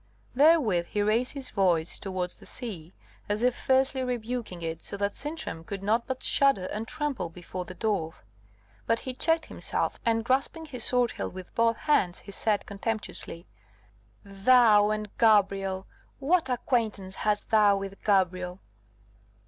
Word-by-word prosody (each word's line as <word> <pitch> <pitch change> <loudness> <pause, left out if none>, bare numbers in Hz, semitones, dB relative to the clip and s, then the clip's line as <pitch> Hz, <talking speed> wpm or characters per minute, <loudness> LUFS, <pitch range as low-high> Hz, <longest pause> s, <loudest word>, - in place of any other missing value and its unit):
Therewith 255 - +4
he 205 - -1
raised 225 +4 +1
his 275 -3 -5
voice 175 -5 +1
towards 185 -2 -4
the - - -13
sea, 185 -10 -6 0.4
as 210 +3 -1
if 250 0 +3
fiercely 265 0 +1
rebuking 240 -7 -4
it, 165 0 -4
so 200 - -4
that 200 0 -1
Sintram 290 - -5
could 195 +3 -6
not 225 +4 +1
but 260 -1 -4
shudder 275 -10 +3
and 220 +2 -4
tremble 275 - -2
before 180 +2 -7
the 185 - -9
dwarf. 195 -7 -2 0.6
But 230 0 +1
he 260 - -5
checked 325 +5 +1
himself, - - -2
and 225 -1 +1
grasping 275 +6 0
his 250 -6 -5
sword 245 -2 +2
hilt - - -5
with 185 -1 -9
both 230 0 +2
hands, 190 - +1
he 200 - -11
said, 205 0 0
contemptuously: 200 -4 -4 0.8
"Thou 210 +1 +5
and 215 -1 -3
Gabrielle! 195 -3 +3 0.3
what 310 +1 +1
acquaintance 220 -6 -1
hast 210 -1 -1
thou 210 -2 +5
with 195 0 -7
Gabrielle?" 185 -2 +1
215 Hz, 150 wpm, -28 LUFS, 190-250 Hz, 0.8 s, Thou